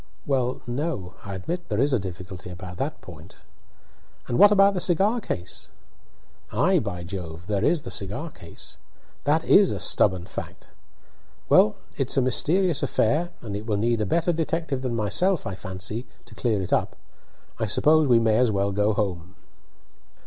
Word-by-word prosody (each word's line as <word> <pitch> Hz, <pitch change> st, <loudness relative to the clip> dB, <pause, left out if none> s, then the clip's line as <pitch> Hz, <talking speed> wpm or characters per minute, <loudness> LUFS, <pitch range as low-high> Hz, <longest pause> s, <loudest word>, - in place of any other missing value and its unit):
"Well, 130 Hz, -3 st, 0 dB
no; 120 Hz, -, -3 dB
I 100 Hz, -1 st, -6 dB
admit 170 Hz, -, -5 dB
there 105 Hz, -1 st, -1 dB
is 140 Hz, +2 st, +2 dB
a 130 Hz, -, +3 dB
difficulty 95 Hz, -1 st, -8 dB
about 90 Hz, 0 st, -8 dB
that 145 Hz, +7 st, -3 dB
point." 80 Hz, -3 st, -12 dB, 0.9 s
"And 120 Hz, -, -1 dB
what 205 Hz, -, +8 dB
about 200 Hz, -1 st, +5 dB
the 185 Hz, -, -1 dB
cigar 195 Hz, +7 st, +2 dB
case?" 90 Hz, -, -6 dB, 0.8 s
"Ay, 175 Hz, -, +3 dB
by 90 Hz, -7 st, -4 dB
Jove! 85 Hz, -2 st, -7 dB
there 100 Hz, 0 st, -1 dB
is 165 Hz, +2 st, +2 dB
the -, -, -7 dB
cigar 100 Hz, -, -4 dB
case. 85 Hz, -, -9 dB, 0.5 s
That 155 Hz, +3 st, +2 dB
is 195 Hz, +1 st, +5 dB
a -, -, -3 dB
stubborn 95 Hz, -4 st, +2 dB
fact. -, -, -8 dB, 0.8 s
Well, 105 Hz, -, +5 dB, 0.2 s
it's 135 Hz, +1 st, 0 dB
a -, -, +5 dB
mysterious 165 Hz, +5 st, +2 dB
affair, 145 Hz, +5 st, +1 dB
and 105 Hz, -4 st, -5 dB
it 105 Hz, +3 st, -6 dB
will 105 Hz, -2 st, 0 dB
need 115 Hz, +1 st, +1 dB
a 105 Hz, -, 0 dB
better 170 Hz, -, +1 dB
detective 160 Hz, -3 st, -2 dB
than 125 Hz, -3 st, -2 dB
myself, 150 Hz, -, +1 dB
I 95 Hz, -, -3 dB
fancy, 95 Hz, +5 st, -5 dB, 0.2 s
to 120 Hz, -, -14 dB
clear 110 Hz, -3 st, 0 dB
it 90 Hz, -, -3 dB
up. -, -, 0 dB, 0.6 s
I 110 Hz, -, 0 dB
suppose 155 Hz, +8 st, +4 dB
we 120 Hz, -2 st, +5 dB
may 110 Hz, -1 st, +3 dB
as 125 Hz, -1 st, +3 dB
well 100 Hz, -1 st, 0 dB
go 105 Hz, +2 st, +1 dB
home." 95 Hz, -3 st, -3 dB
115 Hz, 170 wpm, -25 LUFS, 95-155 Hz, 0.9 s, what